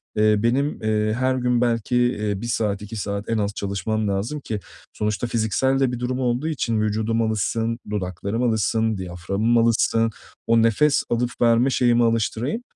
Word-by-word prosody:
eee, 105 0 +4
benim, 135 +4 0
eee, 110 0 +1
her 130 0 +2
gün 125 -1 +1
belki, 120 0 0
eee, 105 -5 0
1 120 - -4
saat, 105 -4 -1
2 105 +2 -8
saat 100 0 -4
en 115 - +1
az 100 -1 -1
çalışmam 105 +2 -2
lazım 100 +10 -2
ki 110 -6 -4 0.3
sonuçta 105 +3 -2
fiziksel 120 +4 +1
de 135 -2 +2
bir 125 - -4
durum 125 +1 -2
olduğu 125 +3 0
için 115 -8 -1
vücudum 110 +2 0
alışsın, 115 +2 -1
dudaklarım 100 +3 -3
alışsın, 110 -1 +1
diyaframım 95 +6 -1
alışsın, 115 0 +2 0.4
o 115 0 +4
nefes 125 +6 +3
alıp 120 +1 0
verme 120 +2 +4
şeyimi 120 -2 +3
alıştırayım. 115 - 0
115 Hz, 165 wpm, -23 LUFS, 105-120 Hz, 0.4 s, eee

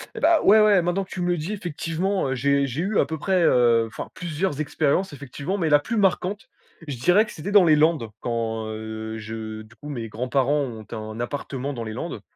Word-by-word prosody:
Et - - -6
bah, 330 0 +5
ouais, 215 +2 +7
ouais 205 -3 +5
maintenant 175 +3 0
que 190 - -15
tu 185 - -6
me 175 - 0
le 175 0 +1
dis, 160 +5 -4
effectivement, 185 -1 -2
heu, 130 - -1
j'ai 140 +2 +2
j'ai 135 +5 -3
eu 200 +3 0
à - - +4
peu 160 - -4
près, 185 +3 +1
heu 120 -6 +4
enfin, 110 - -7
plusieurs 165 -2 -2
expériences 155 +5 0
effectivement, 145 +6 -5
mais 165 -5 0
la 145 - +7
plus 230 +10 -3
marquante, 200 +4 0 0.4
je 140 -3 -4
dirais 180 - +4
que 215 - -11
c'était 180 +6 -5
dans 205 -3 +7
les 155 -2 +6
Landes. 150 -6 +2
Quand, 115 -2 -2
heu, 110 0 -6
je 110 0 -6
du 110 +2 -19
coup 145 +7 -10
mes 120 -6 -4
grands-parents 130 +6 0
ont 115 -5 -7
un 110 0 -6
appartement 135 +2 -4
dans 120 -3 -5
les 110 - -5
Landes 165 +9 -5
145 Hz, 230 wpm, -24 LUFS, 115-180 Hz, 0.4 s, ouais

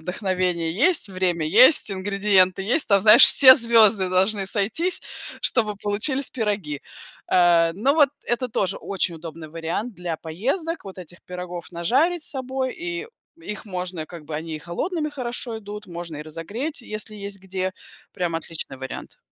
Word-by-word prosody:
вдохновение 180 -2 -1
есть, 310 - +1
время 180 -4 -1
есть, 255 - +5
ингредиенты 195 -1 +2
есть. 245 +10 0
Там, 200 -1 +4
знаешь, 215 0 +9
все 260 -2 +9
звёзды 225 -5 +5
должны 195 +2 +1
сойтись, 220 - -1 0.4
чтобы 215 -4 +2
получились 215 +8 0
пироги. 205 - -3 0.5
Э, 170 -2 +4
но 265 +9 +1
вот 295 -3 +5 0.2
это 245 +1 -1
тоже 195 -3 -1
очень 180 -3 -2
удобный 160 -1 -9
вариант 165 +8 -4
для 175 -2 -4
поездок, 255 - -3
вот 190 -1 -10
этих 175 0 -10
пирогов 180 -1 -7
нажарить 280 - +1
с - - +3
собой, 260 -1 -3
и 360 +3 -5 0.3
их 210 -7 -7
можно, 180 -4 -4
как 165 -3 -11
бы, 155 0 -7
они 160 +1 -5
и - - -8
холодными 305 - -3
хорошо 245 -3 -3
идут, 210 0 -9
можно 170 -2 -7
и 150 - -6
разогреть, 205 - -5
если 215 -1 -4
есть 200 -1 -5
где, 185 0 -3 0.4
прям 175 -3 -3
отличный 165 -4 -6
вариант. 130 0 -8
195 Hz, 155 wpm, -23 LUFS, 175-240 Hz, 0.5 s, знаешь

